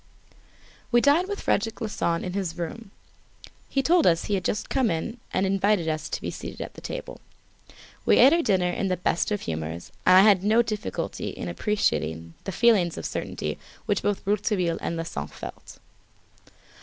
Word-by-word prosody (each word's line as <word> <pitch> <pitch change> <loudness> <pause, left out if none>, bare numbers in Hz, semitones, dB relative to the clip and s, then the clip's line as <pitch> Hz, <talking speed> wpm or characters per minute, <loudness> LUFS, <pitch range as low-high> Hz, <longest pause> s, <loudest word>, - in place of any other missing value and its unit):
We 240 - +6
dined 295 +8 +4
with 405 0 -4
Frederic 225 -1 0
Larsan 190 -6 -1
in 180 - -4
his 185 -4 -3
room. 175 +6 -5 0.8
He 270 - 0
told 340 +1 +4
us 165 -1 +3
he 205 - -2
had 190 -2 0
just 210 - -1
come 260 -4 +1
in 215 +9 -3
and 190 - +1
invited 195 -2 +2
us 155 0 -2
to - - -3
be - - -3
seated - - -8
at - - -6
table. - - -6 0.8
We - - +4
ate 265 +5 +8
our 340 - +3
dinner 185 - +2
in 195 - -1
the 185 -1 0
best 170 0 0
of 210 -1 -1
humours, 80 +1 -5
and 185 - +7
I - - +9
had 200 -3 +5
no 220 +3 +4
difficulty 215 -2 -4
in - - -6
appreciating 80 - -1
the 195 - -3
feelings 195 -5 +3
of - - -5
certainty - - -4 0.3
which 205 -2 0
both 205 -1 -1
Rouletabille 195 -4 0
and 170 - -2
Larsan 165 - -4
felt. - - -10
195 Hz, 180 wpm, -26 LUFS, 170-225 Hz, 0.8 s, I